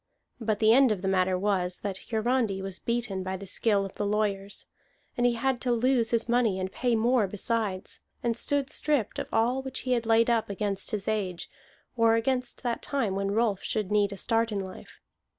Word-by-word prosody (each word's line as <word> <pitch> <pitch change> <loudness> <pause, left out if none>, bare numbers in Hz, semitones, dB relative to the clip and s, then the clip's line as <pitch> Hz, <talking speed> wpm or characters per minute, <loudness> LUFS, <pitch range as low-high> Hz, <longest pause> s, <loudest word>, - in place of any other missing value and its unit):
But 220 -2 0
the 220 +1 +5
end 260 -1 +6
of 200 -3 -2
the - - 0
matter 185 -1 +2
was, 185 -2 0
that 195 -2 -4
Hiarandi 225 -3 +1
was 190 -1 -4
beaten 235 -5 -2
by 190 0 -3
the 200 - -9
skill 200 +1 +1
of 195 - -10
lawyers; 205 -1 -1 0.5
and 245 0 +3
he 240 - +2
had 245 +1 -1
to 250 - 0
lose 240 -1 +2
his 230 -1 +1
money 235 -5 +2
and 185 0 -3
pay 245 -2 0
more 230 -1 +3
besides, 205 -1 -3 0.2
and 235 -1 +1
stood 285 +3 0
stripped 295 -8 0
of - - -4
all 245 +4 +2
which 265 -1 -5
he 255 - -3
had 235 -2 +1
laid 230 0 +4
up 230 -3 +1
against 200 -1 -3
his 205 -2 -3
age, 195 -5 -2 0.4
or 230 -1 +4
against 250 +2 -1
that 240 -2 -1
time 250 -9 -1
when 195 0 -1
Rolf 210 -2 +1
should 210 -2 -2
need 205 -1 +3
a 200 - -6
start 230 +2 +1
in 205 - -1
life. 190 -1 -10
220 Hz, 205 wpm, -28 LUFS, 195-240 Hz, 0.5 s, end